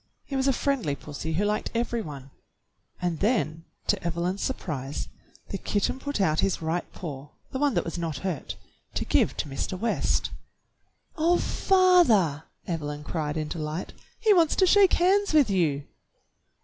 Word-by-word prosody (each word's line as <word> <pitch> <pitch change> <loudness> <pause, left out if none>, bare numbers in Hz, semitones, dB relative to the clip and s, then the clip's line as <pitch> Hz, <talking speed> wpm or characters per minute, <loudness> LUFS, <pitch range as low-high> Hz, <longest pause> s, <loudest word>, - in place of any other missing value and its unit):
He 275 - -5
was 265 0 +1
a - - +5
friendly 255 - 0
pussy 150 +3 -6
who 195 +6 +1
liked 210 +1 0
every 235 0 0
one. 140 -6 -8 0.7
And 175 -3 -1
then 185 -8 0 0.2
to - - 0
Evelyn's 170 +3 -1
surprise 145 - -3 0.4
the 195 - -4
kitten 205 +5 -1
put 285 -3 -3
out 160 -5 +2
his 195 - +1
right 165 +2 -2
paw, 145 -5 -7 0.2
the 260 - -3
one 290 -3 +2
that - - +1
was 170 +1 -4
not 165 -4 -2
hurt, 175 -7 -3 0.4
to - - -1
give - - +2
to - - -2
Mr. 140 +6 -3
West. 230 +2 0 0.9
"Oh, 340 +3 +4
father!" 335 - +4 0.2
Evelyn 150 -3 -4
cried 150 0 -2
in 155 -1 -2
delight, 155 +2 -4 0.3
"he 440 -2 +5
wants 335 -5 +4
to 380 - +4
shake 390 0 +6
hands 390 +2 +3
with 280 -9 +5
you 155 -7 +1
180 Hz, 160 wpm, -27 LUFS, -, 0.9 s, shake